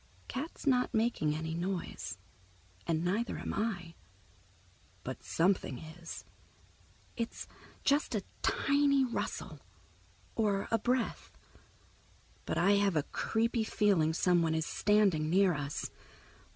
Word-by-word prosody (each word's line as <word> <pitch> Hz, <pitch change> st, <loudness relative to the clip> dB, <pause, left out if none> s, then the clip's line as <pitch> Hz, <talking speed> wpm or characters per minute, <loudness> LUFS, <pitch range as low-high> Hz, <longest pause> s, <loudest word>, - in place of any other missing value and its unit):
Cat's 290 Hz, +6 st, -5 dB
not 250 Hz, -4 st, +2 dB
making 220 Hz, -10 st, +1 dB
any 160 Hz, +1 st, -3 dB
noise, 175 Hz, -, -3 dB, 0.7 s
and 160 Hz, 0 st, +1 dB
neither 210 Hz, +6 st, 0 dB
am -, -, -4 dB
I, 185 Hz, -6 st, -2 dB, 1.1 s
but 130 Hz, -, -6 dB
something 175 Hz, -6 st, +1 dB
is. 160 Hz, +4 st, -9 dB, 0.9 s
It's 230 Hz, -1 st, -4 dB, 0.4 s
just 285 Hz, +2 st, +2 dB
a -, -, -1 dB, 0.2 s
tiny 280 Hz, -1 st, +3 dB
rustle, 240 Hz, -, -4 dB, 0.7 s
or 205 Hz, -3 st, +1 dB
a 230 Hz, -, +3 dB
breath, 250 Hz, +2 st, -1 dB, 1.1 s
but -, -, -1 dB
I 200 Hz, +4 st, +5 dB
have 200 Hz, -3 st, +2 dB
a 150 Hz, -, +2 dB
creepy 230 Hz, +6 st, 0 dB
feeling 200 Hz, -8 st, +3 dB
someone 165 Hz, -1 st, +2 dB
is 160 Hz, -1 st, 0 dB
standing 195 Hz, -8 st, +3 dB
near 190 Hz, +1 st, +4 dB
us. 145 Hz, -1 st, -3 dB
195 Hz, 110 wpm, -32 LUFS, 160-230 Hz, 1.1 s, I